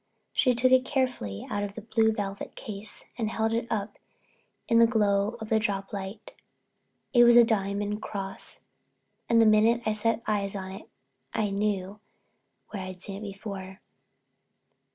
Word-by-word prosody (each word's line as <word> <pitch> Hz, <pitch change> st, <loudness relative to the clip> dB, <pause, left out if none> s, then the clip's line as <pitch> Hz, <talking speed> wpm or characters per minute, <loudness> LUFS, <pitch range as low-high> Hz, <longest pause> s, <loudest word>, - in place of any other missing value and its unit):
She 255 Hz, -3 st, +3 dB
took 255 Hz, +2 st, +3 dB
it 260 Hz, 0 st, +6 dB
careful 255 Hz, -, -2 dB
out 205 Hz, -, -1 dB
of 205 Hz, 0 st, -5 dB
a -, -, -4 dB
blue 220 Hz, 0 st, +2 dB
velvet 200 Hz, -2 st, -5 dB
case 205 Hz, 0 st, -5 dB
and 220 Hz, -2 st, 0 dB
held 220 Hz, 0 st, 0 dB
it 230 Hz, +1 st, -1 dB
up 210 Hz, -1 st, -3 dB, 0.7 s
in 230 Hz, -, +4 dB
the 230 Hz, -, +7 dB
glow 210 Hz, -1 st, +1 dB
of 220 Hz, -1 st, -7 dB
the 220 Hz, -, +3 dB
drop 200 Hz, -2 st, -2 dB
light. 200 Hz, +2 st, -6 dB, 0.8 s
It 240 Hz, -2 st, +7 dB
was 240 Hz, 0 st, +7 dB
a 240 Hz, -, +10 dB
diamond 205 Hz, -1 st, -1 dB
cross 195 Hz, -2 st, -5 dB, 0.7 s
and 230 Hz, -1 st, +5 dB
the 225 Hz, -, +6 dB
minute 220 Hz, +2 st, +4 dB
I 215 Hz, -, +2 dB
set 230 Hz, +1 st, 0 dB
eyes 205 Hz, -2 st, -1 dB
on 190 Hz, -1 st, -5 dB
it 195 Hz, -, -10 dB, 0.5 s
I 210 Hz, -2 st, 0 dB
knew 200 Hz, 0 st, -1 dB, 0.7 s
where 200 Hz, -, -5 dB
I'd 185 Hz, -1 st, -7 dB
seen 195 Hz, -1 st, -5 dB
it -, -, -9 dB
before. 195 Hz, -1 st, -8 dB
210 Hz, 165 wpm, -28 LUFS, 200-230 Hz, 0.8 s, a